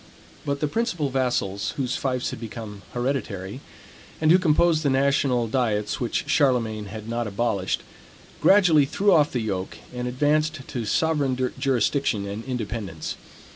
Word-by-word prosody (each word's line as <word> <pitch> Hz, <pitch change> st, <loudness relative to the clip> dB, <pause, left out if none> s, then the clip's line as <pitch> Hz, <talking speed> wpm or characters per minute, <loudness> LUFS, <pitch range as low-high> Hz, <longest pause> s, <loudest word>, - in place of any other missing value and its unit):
But 140 Hz, 0 st, -1 dB
the 150 Hz, -, +2 dB
principal 175 Hz, -, -1 dB
vassals, 120 Hz, -7 st, -1 dB
whose 130 Hz, -2 st, -1 dB
fiefs 125 Hz, -2 st, -1 dB
had -, -, -7 dB
become 110 Hz, -3 st, -7 dB
hereditary, 120 Hz, -4 st, -3 dB, 0.6 s
and 155 Hz, 0 st, +4 dB
who 180 Hz, -, +7 dB
composed 165 Hz, -1 st, +3 dB
the 145 Hz, -, +1 dB
national 135 Hz, -3 st, +2 dB
diets 110 Hz, -4 st, 0 dB
which 120 Hz, -, -2 dB
Charlemagne 115 Hz, -7 st, +2 dB
had 110 Hz, +2 st, -8 dB
not 115 Hz, 0 st, -2 dB
abolished, 100 Hz, -2 st, -1 dB, 0.6 s
gradually 180 Hz, -7 st, +6 dB
threw 200 Hz, +8 st, +2 dB
off 150 Hz, -3 st, +4 dB
the 125 Hz, -, -1 dB
yoke 95 Hz, -4 st, -3 dB, 0.2 s
and 125 Hz, 0 st, -3 dB
advanced 150 Hz, +3 st, +1 dB
to 120 Hz, -3 st, -4 dB
sovereign 130 Hz, 0 st, +1 dB
jurisdiction 130 Hz, -4 st, +1 dB
and 100 Hz, +3 st, -5 dB
independence. 110 Hz, -, -4 dB
125 Hz, 140 wpm, -24 LUFS, 110-145 Hz, 0.6 s, who